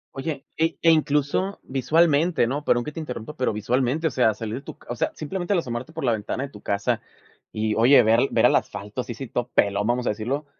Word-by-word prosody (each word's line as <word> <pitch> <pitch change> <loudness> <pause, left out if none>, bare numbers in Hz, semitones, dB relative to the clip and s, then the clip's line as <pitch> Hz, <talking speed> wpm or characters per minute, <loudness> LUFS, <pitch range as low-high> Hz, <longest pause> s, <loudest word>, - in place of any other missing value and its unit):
Oye, 140 0 -4
e 165 +1 +1
e 165 - +7
incluso 155 +5 +1
visualmente, 155 +2 +2
¿no? 140 +5 -2
Perdón 120 -3 +2
que 150 - -6
te 160 - -7
interrumpa, 150 -1 -6
pero 130 - 0
visualmente, 125 +8 0
o 155 - +2
sea, 120 -4 +3
salir 110 -1 -5
de - - -7
tu - - -10
ca - - -21
o 120 - -2
sea, - - -1
simplemente 175 +5 -3
al 175 - +3
asomarte 125 0 -5
por 160 -3 -6
la 120 - +3
ventana 110 +5 -2
de 140 - -5
tu 105 - -13
casa. 100 0 -1 0.5
Y 110 0 -1
oye, 120 +3 +6
ver 115 +5 +4
ver - - +3
al - - +5
asfalto 105 +5 -2
así 120 - -6
así 130 +2 -7
todo 120 +1 -3
pelón, 100 +1 +2
vamos 125 +1 0
a - - +1
decirlo, 125 +8 -3
130 Hz, 240 wpm, -24 LUFS, 115-150 Hz, 0.5 s, e